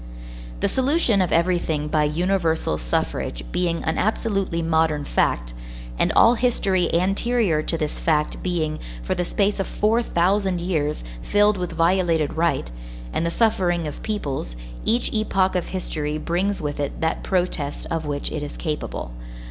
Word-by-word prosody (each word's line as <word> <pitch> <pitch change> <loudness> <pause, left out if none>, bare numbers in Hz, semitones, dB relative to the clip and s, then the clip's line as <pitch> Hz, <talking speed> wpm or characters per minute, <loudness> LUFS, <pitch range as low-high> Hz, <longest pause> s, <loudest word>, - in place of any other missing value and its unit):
The - - +3
solution 260 - +2
of 180 - 0
everything 165 -3 +1
by 150 0 +2
universal 165 - 0
suffrage - - -2
being 170 -2 0
an 160 - -1
absolutely 195 -5 0
modern 160 -2 +1
fact, - - 0 0.5
and - - +3
all 230 - +7
history 200 -7 +1
anterior 195 0 +2
to 165 - -1
this 155 -2 -3
fact 150 -2 0
being, 160 -4 -1 0.2
for - - 0
the 180 - -1
space 200 +3 0
of 195 - -1
four 220 +3 +2
thousand 190 -2 +1
years, 155 - -1 0.2
filled 205 - +3
with 180 -2 -3
violated 165 -2 +2
right, 160 - 0 0.4
and - - 0
the 170 - +1
suffering 175 -4 +1
of 150 - -6
peoples, 140 - -3 0.3
each 235 +2 +1
epoch 195 -4 +1
of 180 -2 -1
history 155 -5 -3
brings 180 +4 -1
with 145 -1 -3
it 145 -1 -3
that 160 0 0
protest 175 -6 -1
of 165 -1 -1
which 145 -1 -2
it - - -3
is 145 - -6
capable. 150 - -4
170 Hz, 155 wpm, -23 LUFS, 155-195 Hz, 0.5 s, all